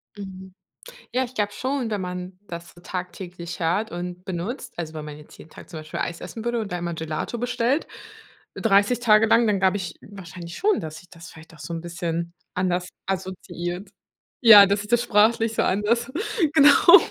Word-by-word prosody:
Mhm. 190 -2 -9 0.6
Ja, 255 +1 +2
ich 250 0 -8
glaube 205 -2 0
schon, 260 0 -2
wenn 210 -3 -2
man 180 0 -6
das 170 0 -8
so 175 - -17
tagtäglich 180 -1 -6
hört 180 +6 0
und 180 +1 -6
benutzt, 205 +8 -5
also 160 -2 -5
wenn 155 -1 -6
man 150 -1 -8
jetzt 150 - -15
jeden - - -14
Tag - - -13
zum 160 - -7
Beispiel 155 0 -7
Eis 170 - -3
essen 180 +5 -7
würde 240 0 0
und 210 -3 -5
da 180 - -1
einmal 175 -1 -3
Gelato 160 +8 -4
bestellt. 245 +4 0 0.7
30 205 +2 +3
Tage 220 -2 +5
lang, 230 +1 +5
dann 205 -2 +2
glaube 190 +1 +3
ich 180 -4 -5
wahrscheinlich 175 -3 -10
schon, 415 +1 +2
dass 160 -1 -6
sich 180 +2 -15
das 165 -1 -12
vielleicht 160 0 -15
auch 155 - -16
so 150 +3 -6
'n 165 - -4
bisschen 170 -1 -4 0.2
anders 180 0 0 0.2
assoziiert. 185 0 -4 0.5
Ja, 215 -4 +10
dass 200 +1 +1
sich 210 - -10
das 240 0 +3
sprachlich 225 +1 +3
so - - +2
anders, 230 +6 +1 0.4
genau 315 +5 +8
185 Hz, 195 wpm, -24 LUFS, 170-225 Hz, 0.7 s, Ja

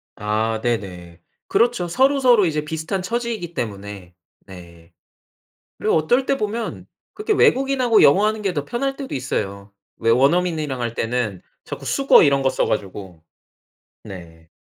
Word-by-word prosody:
아 110 +2 -1
네네. 90 -7 -4 0.3
그렇죠. 235 -7 +1
서로서로 255 0 +3
이제 155 -3 -1
비슷한 160 +5 -3
처지이기 225 -4 -4
때문에 100 - -6 0.3
네. 85 -3 -14 0.8
그리고 - - 0
어떨 240 - +2
때 275 - 0
보면 220 +1 -4 0.3
그렇게 425 +1 -1
외국인하고 265 - +3
영어하는 210 +8 +3
게 195 -3 -1
더 145 -3 -3
편할 270 +3 -2
때도 275 -1 -7
있어요. 100 -6 -4 0.3
왜 115 - -1
원어민이랑 150 0 +1
할 120 -1 -3
때는 115 -5 -2 0.2
자꾸 - - -8
숙어 275 -8 +4
이런 140 -2 +3
거 135 - +2
써가지고. 95 -7 -3 0.8
네. 80 -3 -12
145 Hz, 300 characters per minute, -21 LUFS, -, 0.8 s, 숙어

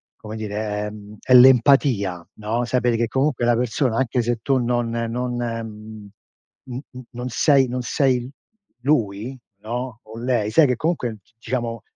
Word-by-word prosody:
come 110 0 -9
dire, 105 -1 -5 0.3
è, - - -4
mhmm, 105 0 -12 0.2
l'empatia, 125 - +5
no, 110 +3 -2
sapere 120 -1 +1
che 115 0 +1
comunque 135 0 0
la 120 0 +4
persona 125 0 0
anche 125 -1 +1
se 120 0 -1
tu 135 -1 +2
non 120 -1 0
non 115 +2 -2
n 110 -2 -6 0.6
n 125 0 -4 0.3
non 125 0 -5
sei 135 +3 +3
non 125 +1 -3
sei 125 -1 0 0.5
lui, 120 -3 0 0.3
no, 120 +2 -5
o 110 +1 -11
lei, 120 -4 0
sai 150 +5 +5
che 125 - +1
comunque 125 -6 -2 0.2
diciamo 115 -2 -3
120 Hz, 150 wpm, -22 LUFS, 110-125 Hz, 0.6 s, l'empatia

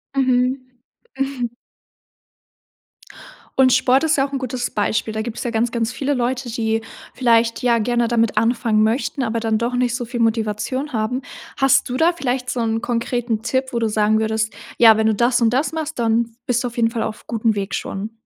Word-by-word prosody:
Mhm. 255 0 +2 0.6
Mhm. 270 -4 -2 2.1
Und 260 -1 +5
Sport 260 +2 +3
ist 310 - +2
ja 275 +1 +2
auch - - -18
'n 270 - -1
gutes 255 -1 -3
Beispiel. 215 +1 -1
Da 220 - -2
gibt's 230 0 -5
ja 240 - -2
ganz 230 +1 0
ganz 235 0 -1
viele 285 +1 -1
Leute, 250 0 -2
die 225 -1 -1 0.3
vielleicht, 230 -2 +2
ja, 240 -2 +3
gerne 240 +1 +1
damit 230 -2 +1
anfangen 230 -1 +2
möchten, 255 +4 0
aber 230 0 -1
dann 220 -1 0
doch 235 +2 -2
nicht 245 -1 +1
so 245 -2 -3
viel 240 +1 -5
Motivation 225 +5 -1
haben. 225 +4 -1 0.4
Hast 270 -2 +3
du 250 - -2
da 335 +4 +3
vielleicht 250 -5 -2
so 245 - -2
'n 225 0 -1
konkreten 235 -1 -1
Tipp, 260 +2 0
wo 235 - -1
du 225 - +1
sagen 215 0 +2
würdest, 220 0 -1 0.2
ja, 225 -2 +7
wenn 220 0 +2
du 220 - +2
das 240 +2 +2
und 230 0 +3
das 275 +6 +1
machst, 315 -3 -4
dann 230 0 +1
bist 245 0 0
du - - -1
auf 235 - -16
jeden 230 -1 +3
Fall 225 - -2
auf 215 - -6
gutem 225 -1 0
Weg 195 -1 -3
schon? 205 +3 -5
235 Hz, 200 wpm, -20 LUFS, 225-255 Hz, 2.1 s, ja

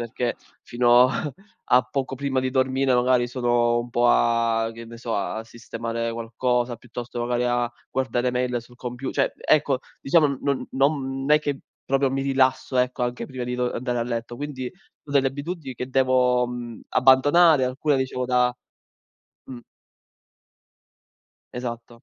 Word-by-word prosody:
perché 120 +1 -3 0.3
fino, 120 +1 +5
a 145 +3 -2 0.4
a 125 +1 +7
poco 130 +1 -3
prima 135 -1 -1
di 130 0 -1
dormire 130 0 +1
magari 125 0 +3
sono 120 -1 +1
un 120 +1 -5
po' 120 0 +2
a 115 - +2
che 115 0 -9
ne 115 0 -10
so, 115 -1 -4
a 110 +2 -3
sistemare 115 0 -4
qualcosa, 120 +1 -1
piuttosto 120 +1 -7
magari 120 +1 0
a 120 -1 0 0.2
guardare 125 -1 0
mail 125 -1 -1
sul 120 +1 -18
compiu 125 +1 -5
cioè, - - +1
mhmm, - - -30
ecco, 145 -3 +3 0.2
diciamo, 155 +2 +4
n 140 - -3
non 140 -2 -1
non 135 0 0
è 150 - +7
che 145 -2 -3 0.2
proprio 135 0 +1
mi 135 +1 -1
rilasso, 130 -1 +1
ecco, 125 0 0
anche 120 0 -4
prima 130 -2 -5
di 125 0 -3
do 125 0 0
uhm, - - -3
andare 125 0 -2
a - - +1
letto. 120 0 -4
Quindi, 140 -2 -5
ho 180 -2 -20
delle 140 -1 +3
abitudini 145 0 -6
che 125 +1 -5
devo, 125 -1 +3
mhmm, 120 -1 -7
abbandonare, 140 +4 +5
alcune 135 +3 0
dicevo 130 -1 -2
da 125 -1 +2 0.9
mh. 125 -2 -9 1.9
Esatto. 120 -1 -7
125 Hz, 165 wpm, -24 LUFS, 120-135 Hz, 1.9 s, a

